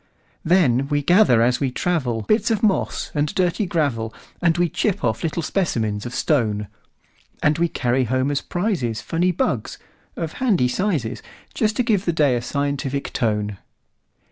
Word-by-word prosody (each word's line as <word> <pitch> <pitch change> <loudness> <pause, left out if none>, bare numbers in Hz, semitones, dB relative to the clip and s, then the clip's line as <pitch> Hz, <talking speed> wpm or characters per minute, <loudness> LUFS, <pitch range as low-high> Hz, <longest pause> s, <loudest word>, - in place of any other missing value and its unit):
Then 140 -7 +3
we 145 0 0
gather 175 - +5
as 125 +1 +2
we 135 - 0
travel, 125 -6 -1
Bits 215 - +2
of 220 -2 0
moss 205 -3 0
and 150 0 +1
dirty 185 +2 +1
gravel, 135 -10 -1 0.3
And 170 -1 +2
we 175 0 +3
chip 200 +3 -1
off 110 -1 0
little 165 +1 -2
specimens 110 - -1
of 120 - -7
stone; 110 -8 +1 0.8
And 150 +1 +2
we 170 - +3
carry 125 -4 0
home 130 +4 0
as 140 - 0
prizesFunny 175 - -1
bugs, 110 -4 -1 0.4
of 160 -2 -4
handy 195 - +3
sizes, 155 - -1 0.3
Just 215 -1 0
to 250 - +1
give 210 -5 +1
the 170 - +1
day 145 -5 +3
a 120 - -1
scientific 140 +1 -2
tone. 105 -3 -1
145 Hz, 160 wpm, -22 LUFS, 120-175 Hz, 0.8 s, gather